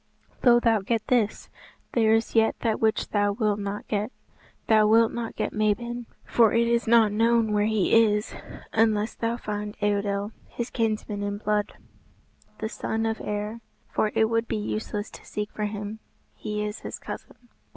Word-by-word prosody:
"Though 240 -2 +6
thou 225 -3 +3
get 225 +2 -1
this, 230 -5 +1 0.4
there 220 -2 +4
is 225 - -1
yet 225 -1 +3
that 225 -2 0
which 220 -1 +1
thou 205 -1 +1
wilt 210 -1 0
not 200 0 -4
get. 210 +3 -1 0.5
Thou 215 -1 +5
wilt 225 +1 +5
not 235 -1 -5
get - - -2
Mabon, 230 +3 -1 0.2
for 230 -3 +4
it 235 0 +3
is 235 0 +1
not 225 -2 +5
known 225 +1 +3
where 210 0 +2
he 220 -4 +1
is, 210 -1 0 0.4
unless 220 -1 +2
thou 230 +1 -2
find 210 -2 -5
Eidoel, 205 0 0 0.2
his 235 0 -5
kinsman 215 -3 -1
in 205 0 -2
blood, 210 0 -1 0.8
the 220 - -3
son 225 0 -2
of 225 0 -2
Aer. 210 +2 -4 0.3
For 215 - 0
it 220 - +4
would 230 +1 0
be - - -1
useless 210 0 -3
to - - -12
seek 210 0 -5
for 210 - -3
him. 210 +1 -5 0.3
He 210 0 -3
is 210 +1 -5
his - - -6
cousin." 240 - -10
215 Hz, 170 wpm, -26 LUFS, 210-230 Hz, 0.8 s, Though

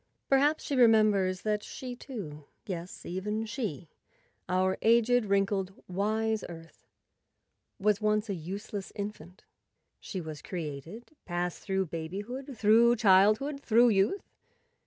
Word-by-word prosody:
Perhaps 290 +3 +3
she 285 - -2
re¬ 245 -3 +7
members 200 -4 +3
that 210 -1 0
she, 255 +1 -7
too—yes, 180 - -8
even 210 +5 -3
she, 210 - -4 0.6
our 185 +1 +2
aged, 235 +1 +4
wrinkled, 195 -1 0
wise 215 +3 0
Earth—was 190 +4 -6
once 215 0 +1
a 200 - -2
useless 195 +3 -6
infant. 200 -3 -7 0.6
She 190 - -6
was 155 -3 -7
created, 170 - -7
passed 175 -1 -3
through 190 -1 -1
babyhood, 205 - -6
through 225 +3 +5
childhood, 215 +7 +4
through 235 -1 +5
youth. 205 - +2
205 Hz, 115 wpm, -29 LUFS, 185-225 Hz, 0.6 s, re¬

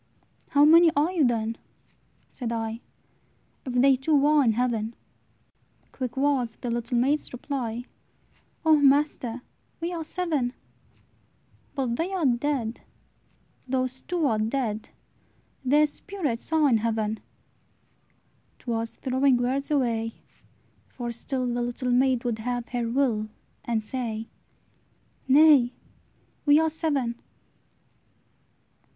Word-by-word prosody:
"How 285 +1 +5
many 335 +2 +7
are 300 +5 +2
you, 345 -5 +2
then," 230 -2 0 0.7
said 240 -3 -4
I, 225 0 -3 0.9
"If 255 - -3
they 265 +2 +5
two 280 +2 +2
are 300 -1 +5
in 230 -3 +3
heaven?" 230 -1 -1 1.0
Quick 255 -1 -5
was 265 -5 +1
the 245 - -5
little 235 +1 -1
maid's 280 +5 +1
reply, 245 -2 -4 0.8
"O 315 -1 +6
master! 275 -4 +2 0.4
we 340 +2 -3
are 330 -2 -3
seven." 310 -8 -1 1.2
"But 250 -4 -1
they 345 +4 -1
are 360 -5 0
dead; 245 -2 0 0.9
those 255 0 -1
two 350 -3 -1
are 225 -6 +1
dead! 220 -1 -2 0.7
Their 295 +4 +4
spirits 300 - -4
are 315 -2 +4
in 235 -5 +3
heaven!" 220 -1 -1 1.4
'T 240 - -6
was 230 0 -2
throwing 260 0 +2
words 260 +3 0
away; 230 -6 0 0.8
for 240 -2 -5
still 255 +2 -2
The 245 0 -1
little 245 +1 -2
maid 255 0 +2
would 235 -3 -2
have 245 +1 -3
her 240 -2 -2
will, 230 -4 0 0.4
And 225 -2 -1
say, 225 -2 -4 1.0
"Nay, 275 -3 +6 0.7
we 290 +1 +7
are 320 0 +2
seven!" 280 -7 -1
255 Hz, 120 wpm, -26 LUFS, 235-290 Hz, 1.4 s, many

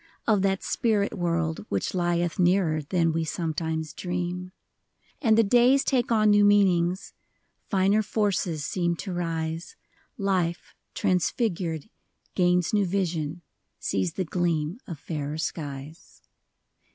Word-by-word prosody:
Of 210 -4 +3
that 195 0 0
spirit 210 -4 +1
world 170 -3 -1
which - - -1
lieth 175 -1 0
Nearer 175 -3 +3
than 165 +2 +1
we 165 0 0
sometimes 160 -1 -3
dream. 180 0 -4 0.7
And 225 -6 +4
the 230 - +6
days 245 +6 +4
take 250 -3 +1
on 215 -2 +4
new 205 0 +5
meanings; 190 -3 +3 0.6
Finer 195 +2 +3
forces 195 -8 -1
seem 175 -2 0
to 185 +2 -5
rise; 165 -1 -3 0.4
Life, 185 -5 -1 0.2
transfigured, 180 - 0 0.5
gains 180 0 +2
new 205 -3 +3
vision, 170 -3 -2 0.3
Sees 95 -3 -1
the 185 - -2
gleam 170 +2 -1
of 170 - -6
fairer 150 0 -4
skies. 150 -1 -6
175 Hz, 120 wpm, -26 LUFS, 160-200 Hz, 0.7 s, the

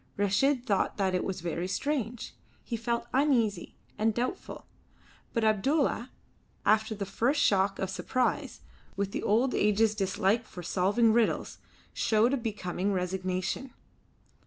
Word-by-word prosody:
Reshid 245 +7 +2
thought 200 -6 0
that 190 -2 +1
it 180 - 0
was 190 -2 -4
very 170 +1 -2
strange. 245 +1 -2 0.3
He 235 - -4
felt 235 +1 -2
uneasy 255 -6 +1 0.2
and 220 0 +2
doubtful. 250 +9 -4 0.7
But 230 - -1
Abdulla, 240 +4 +1 0.6
after 220 +1 +3
the 200 -1 -4
first 250 +9 0
shock 195 -3 +3
of 190 - -3
surprise, 255 +1 -1 0.3
with 200 0 -2
the - - -3
old 235 +6 +2
age's 210 +1 +3
dislike 195 +2 +1
for 180 - -9
solving 205 +6 +2
riddles, 230 -1 0 0.3
showed 225 +4 +2
a - - +2
becoming 205 -4 -2
resignation. 185 +6 -2
215 Hz, 135 wpm, -29 LUFS, 195-240 Hz, 0.7 s, after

